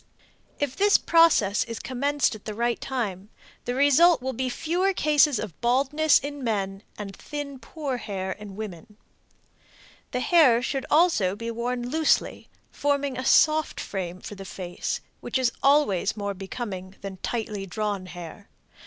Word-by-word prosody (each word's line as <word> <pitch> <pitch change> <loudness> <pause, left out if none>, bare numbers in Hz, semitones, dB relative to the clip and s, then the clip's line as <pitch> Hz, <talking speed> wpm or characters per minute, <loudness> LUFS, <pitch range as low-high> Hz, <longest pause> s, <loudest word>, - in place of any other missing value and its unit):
If 285 -2 -1
this 405 +1 +5
process 325 -12 +4
is 230 -1 -6
commenced 280 +2 0
at 215 - -11
the 215 - -5
right 235 +1 -1
time, 210 -7 -3 0.4
the 245 - -2
result 285 +6 +5
will 260 +1 -3
be 255 +2 -2
fewer 355 +9 0
cases 295 -4 +4
of 205 -8 -6
baldness 275 +6 +3
in 285 0 -5
men 195 -4 -2 0.2
and 200 -2 -7
thin, 290 -2 -6
poor 275 +1 -4
hair 190 -5 -4
in 205 0 -8
women. 210 0 -8 1.1
The 250 - -2
hair 255 -8 +5
should 270 0 -2
also 300 - +3
be 230 +2 -5
worn 240 +1 -3
loosely, 315 +4 +1 0.2
forming 285 -2 0
a 255 - -4
soft 310 +3 +3
frame 185 -2 -5
for 215 - -8
the 195 -1 -9
face, 180 -1 -4 0.2
which - - -2
is 255 -2 +2
always 245 -9 +3
more 200 -1 -2
becoming 195 -1 -6
than 195 -1 -7
tightly 210 -2 -4
drawn 200 -1 -3
hair. 175 +3 -10
240 Hz, 155 wpm, -25 LUFS, 200-285 Hz, 1.1 s, this